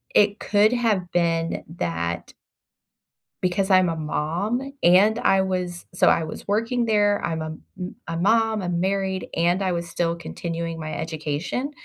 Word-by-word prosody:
it 205 0 +4
could 210 +1 +3
have 215 -7 0
been 165 -1 0
that 85 - -3 1.1
because 185 +2 0
I'm 185 -2 +5
a 165 - -2
mom, 175 - -2
and 195 +6 +5
I 195 -4 +3
was 180 -2 -3
so - - +3
I 165 - +4
was 155 - -8
working 230 +4 +1
there, 205 -2 +2
I'm 160 -1 -2
a - - -3 0.3
m 180 0 -5
a 165 - -3
mom, 220 +3 +2
I'm 175 -1 -1
married, 190 0 -1
and 175 +3 +2
I 185 - +1
was 170 -1 -3
still 170 -1 0
continuing 170 -1 -5
my 155 -1 -5
education, 160 - -3
180 Hz, 155 wpm, -24 LUFS, 165-205 Hz, 1.1 s, I'm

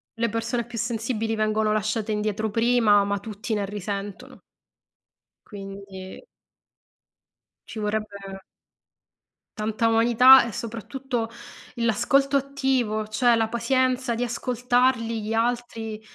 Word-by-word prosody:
Le 230 0 0
persone 230 +2 -2
più 240 -1 -9
sensibili 225 0 -2
vengono 215 0 +1
lasciate 215 +1 -1
indietro 215 0 -1
prima, 225 -2 +4
ma 200 0 -1
tutti 215 +2 -5
ne 205 - -1
risentono. 200 -1 -6 1.1
Quindi 195 - -9 1.4
ci 220 - -7
vorrebbe 200 -2 -4 1.1
tanta 220 +1 0
umanità 235 +3 +7
e - - -6
soprattutto 230 +2 -4 0.5
l'ascolto 275 +5 +2
attivo, 260 -6 -1
cioè 235 +2 +3
la 225 -1 +1
pazienza 255 +1 0
di 240 - -1
ascoltarli 245 -1 0
gli 215 +2 -3
altri, 225 -2 -2
225 Hz, 105 wpm, -24 LUFS, 210-245 Hz, 1.4 s, umanità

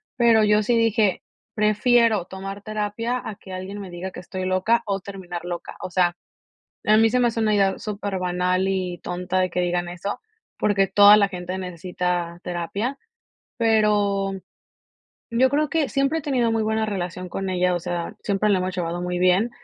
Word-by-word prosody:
pero 235 -3 +5
yo 210 0 +3
sí 235 +3 +2
dije: 220 -4 +2 0.3
"Prefiero 215 -1 +3
tomar 195 +2 -7
terapia 215 +3 -2
a 215 - -6
que 190 - -13
alguien 190 +2 -6
me 195 - -8
diga 180 +2 -6
que 180 - -9
estoy 185 0 -5
loca, 185 +5 +2
o 195 -2 -2
terminar 185 -3 -7
loca". 175 -1 -6
O 185 - -6
sea, 175 -1 +2 0.7
a 215 +1 +5
mí 225 0 +5
se 250 - +1
me 245 - +4
hace 230 -1 -2
una 215 -1 +2
idea 195 -1 +2
súper 205 -2 -4
banal 180 +1 0
y 185 -2 -2
tonta 180 +1 -2
de 185 -1 +1
que 180 - -2
digan 175 0 0
eso, 180 +3 -5 0.4
porque 195 -2 +2
toda 205 +2 +8
la 200 -1 +4
gente 180 0 -5
necesita 180 -1 -3
terapia, 200 +10 -3 0.6
pero 210 -3 +2 1.0
yo 255 +3 +4
creo 295 +1 +1
que 320 -4 +1
siempre 275 +3 +1
he - - -8
tenido 250 -5 +1
muy 225 -1 +1
buena 220 0 0
relación 180 -3 -4
con 195 +2 -3
ella, 180 0 +1
o - - -1
sea, 175 +3 -4
siempre 205 +1 0
la 200 - +4
hemos 185 +1 -3
llevado 175 -1 -2
muy 180 0 -2
bien. 185 +6 +3
195 Hz, 185 wpm, -23 LUFS, 180-220 Hz, 1.0 s, toda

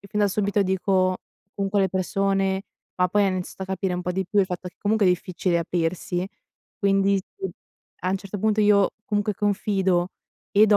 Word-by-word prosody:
e 200 - -13
fin 210 - -1
da 205 - +4
subito 205 +1 +1
dico 185 -1 +2 0.4
comunque 200 0 0
alle 190 - +3
persone 195 +1 0 0.3
ma 180 0 +3
poi 205 +3 +3
hanno 185 -1 +1
iniziato 185 +1 -5
a - - -4
capire 190 -1 -1
un 180 - -3
po' 180 0 -2
di 190 0 -2
più 205 +2 0
il - - +4
fatto 180 0 -5
che 180 - -18
comunque 210 -1 +2
è - - +6
difficile 180 0 0
aprirsi, 175 +2 -1 0.5
quindi 195 0 +3
sì 190 0 -6 0.5
a 185 - -1
un 195 - +1
certo 200 +1 -6
punto 215 +1 +2
io 205 -2 +5 0.2
comunque 205 -1 0
confido 195 -3 +1 0.4
e 210 +2 +6
do 210 - +5
195 Hz, 200 wpm, -24 LUFS, 185-205 Hz, 0.5 s, è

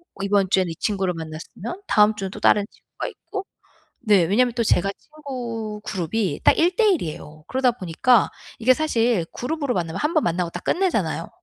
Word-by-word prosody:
어 195 - -6
이번 200 -1 +2
주에는 190 -2 +2
이 - - -6
친구를 195 -1 -1
만났으면 165 - -7
다음 210 +1 +4
주는 195 -2 -4
또 - - -8
다른 205 -1 +4
친구가 - - -8
있고. 395 -2 -7 0.6
네. 205 -5 +5
왜냐하면 240 +8 +2
또 235 -2 0
제가 195 -1 +2
친구 240 -8 -6
그룹이 185 -2 -2
딱 - - +5
1 350 +2 +3
대 455 - +3
1 350 - 0
이에요. 155 -1 -8
그러다 260 -1 +2
보니까 220 +4 +2 0.3
이게 255 +3 +4
사실 235 - +1
그룹으로 280 0 -2
만나면 165 -4 -2
1 300 +2 0
번 310 - +3
만나고 170 0 0
딱 175 - -8
끝내잖아요. 215 - 0
210 Hz, 375 characters per minute, -23 LUFS, 180-255 Hz, 0.6 s, 네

